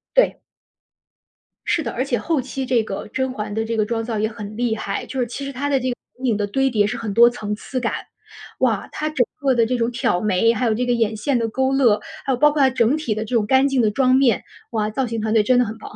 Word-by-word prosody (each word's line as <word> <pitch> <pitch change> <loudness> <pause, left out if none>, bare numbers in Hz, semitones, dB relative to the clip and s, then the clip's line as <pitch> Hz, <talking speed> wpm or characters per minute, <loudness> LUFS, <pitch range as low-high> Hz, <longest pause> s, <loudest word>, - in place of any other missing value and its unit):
对。 - - +3 1.3
是 345 -2 +1
的， - - -3
而 255 - -1
且 265 -3 -1
后 320 0 0
期 265 +1 -5
这 245 -3 +2
个 195 -2 -6
甄 260 +4 -2
嬛 210 -3 -5
的 220 +1 -1
这 230 +1 -2
个 215 - +2
妆 225 0 -2
造 225 -2 -3
也 215 - +1
很 210 -1 -8
厉 235 -2 0
害， 200 -2 -4
就 265 - -5
是 245 - 0
其 275 +4 -6
实 275 - -4
她 280 +2 -3
的 275 -2 +2
这 255 0 -2
个 245 - -2 0.2
眼 260 - -4
影 210 - 0
的 205 - -1
堆 270 +6 +1
叠 210 -4 +2
是 - - -3
很 215 -3 -4
多 235 +3 +7
层 210 -3 -4
次 255 +4 -5
感。 235 -2 -1 0.7
哇， - - +1
她 305 - -3
整 265 -5 +1 0.2
个 270 -2 +2
的 230 -1 +3
这 250 +2 -1
种 235 0 0
挑 235 -7 0
眉， 215 +2 +3
还 235 +2 -1
有 225 - +2
这 250 +3 -1
个 245 - +1
眼 225 -2 0
线 245 +5 0
的 230 - 0
勾 265 +3 0
勒， 235 -6 +4 0.3
还 275 - 0
有 245 - -1
包 295 +3 +5
括 290 -1 0
它 265 - +6
整 255 +2 +2
体 275 -9 -2
的 215 - -2
这 240 +3 -3
种 215 - +2
干 265 +4 +4
净 270 -2 +1
的 215 -2 +2
妆 255 +3 +3
面， 260 -5 +3 0.3
哇， 215 -2 0
造 255 +5 -1
型 225 -1 -3
团 215 0 -1
队 220 -2 +4
真 250 +4 +3
的 250 - +3
很 220 +1 -6
棒 - - -10
啊。 - - -14
235 Hz, 310 characters per minute, -21 LUFS, 215-265 Hz, 1.3 s, 多